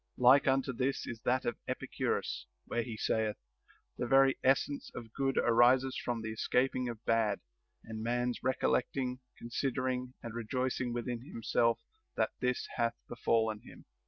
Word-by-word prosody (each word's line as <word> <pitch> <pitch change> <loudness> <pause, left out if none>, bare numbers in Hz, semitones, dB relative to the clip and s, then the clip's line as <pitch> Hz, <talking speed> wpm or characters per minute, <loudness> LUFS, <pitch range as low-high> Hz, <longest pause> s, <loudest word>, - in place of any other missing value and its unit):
Like 130 +3 +6
unto 135 -1 +2
this 130 +3 -1
is 115 -2 -6
that 130 +1 +2
of 120 - -2
Epicurus, - - -2 0.2
where 120 - -1
he 115 -1 -5
saith: 110 -1 0 0.6
The 120 - -1
very 135 +1 +5
essence 135 +2 +2
of 115 -1 -8
good 135 -1 0
arises 125 +3 +4
from 120 -2 -2
the 110 - -3
escaping 125 +3 +1
of 115 -1 -8
bad, 110 -3 +2 0.4
and 110 -1 -7
a - - -4
man's 120 +1 0
recollect 130 0 +1
ing, 125 -1 -1 0.2
considering, 125 +1 -2
and 115 -1 -6
rejoicing 125 +2 -1
within 120 0 -3
himself 115 -2 0 0.3
that - - +1
this 125 0 0
hath 115 -1 +1
befallen 110 -2 +1
him. - - -14
120 Hz, 155 wpm, -33 LUFS, 115-130 Hz, 0.6 s, Like